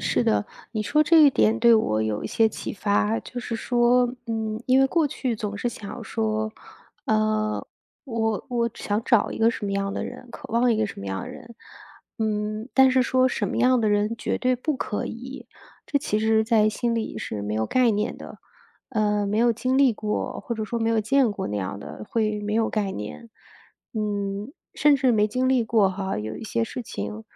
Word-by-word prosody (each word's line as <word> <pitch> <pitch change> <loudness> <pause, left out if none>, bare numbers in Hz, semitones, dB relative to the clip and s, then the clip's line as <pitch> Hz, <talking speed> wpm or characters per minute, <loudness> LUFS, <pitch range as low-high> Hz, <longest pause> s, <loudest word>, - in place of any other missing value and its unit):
是 - - +1
的。 105 -1 +2 0.3
你 215 -2 -1
说 300 +9 +2
这 330 +1 +5
一 285 - +8
点 225 -2 +2
对 235 0 +6
我 110 - +1
有 110 -1 -2
一 - - -1
些 225 -1 +3
启 - - -6
发， 210 +2 +1
就 250 - -8
是 240 -1 -4
说 245 +1 +2
嗯， 220 -1 -3
因 260 +1 +5
为 270 - +5
过 320 +2 +2
去 255 -3 -2
总 205 -2 -4
是 240 - -1
想 220 +1 -8
说 220 -1 -2 0.5
呃， 215 0 0 0.4
我 225 -4 -2
我 235 -1 +1
只 - - -13
想 205 +1 0
找 235 -5 +3
一 - - -5
个 225 +1 +4
什 230 - -3
么 200 - -2
样 195 0 -1
的 - - -2
人， 250 - -9
渴 - - -10
望 235 +1 +3
一 - - +1
个 220 - +1
什 - - -9
么 100 - -7
样 95 0 -3
的 - - -7
人， 235 -1 -11 0.6
嗯， 215 +1 -2
但 265 0 +6
是 260 0 +3
说 255 +1 +3
什 215 -4 -2
么 - - -3
样 250 0 +4
的 215 - +2
人 210 +2 +1
绝 - - -1
对 255 -1 +1
不 295 +3 -2
可 210 -4 -3
以， 250 +2 -8 0.4
这 285 - -1
其 215 -6 0
实 220 0 +3
在 220 -1 +3
心 235 +2 -1
里 220 - -3
是 105 - -4
没 105 +1 -3
有 110 - 0
概 250 - +3
念 210 +3 -1
的。 - - -11 0.5
呃， 210 -3 +1
没 205 +2 -1
有 235 +1 +4
经 255 +3 -1
历 270 -3 +5
过、 210 0 -3
或 235 - -4
者 220 - -3
说 235 +2 -3
没 225 0 0
有 230 -1 +2
见 240 +2 +3
过 205 - -4
那 105 0 -3
样 95 +1 -4
的， 105 +1 -9
会 215 -2 0
没 210 +1 -3
有 225 0 +1
概 205 -3 -1
念。 105 - -7 0.6
嗯， 205 0 -3 0.2
甚 295 -1 +4
至 260 -2 +2
没 210 -1 +3
经 255 +4 0
历 260 -2 +3
过 220 -4 +3
哈， 190 0 -3
有 110 +1 -4
一 - - -9
些 230 +1 -1
事 245 +2 -6
情， 105 - -6
220 Hz, 235 characters per minute, -24 LUFS, 210-240 Hz, 0.6 s, 一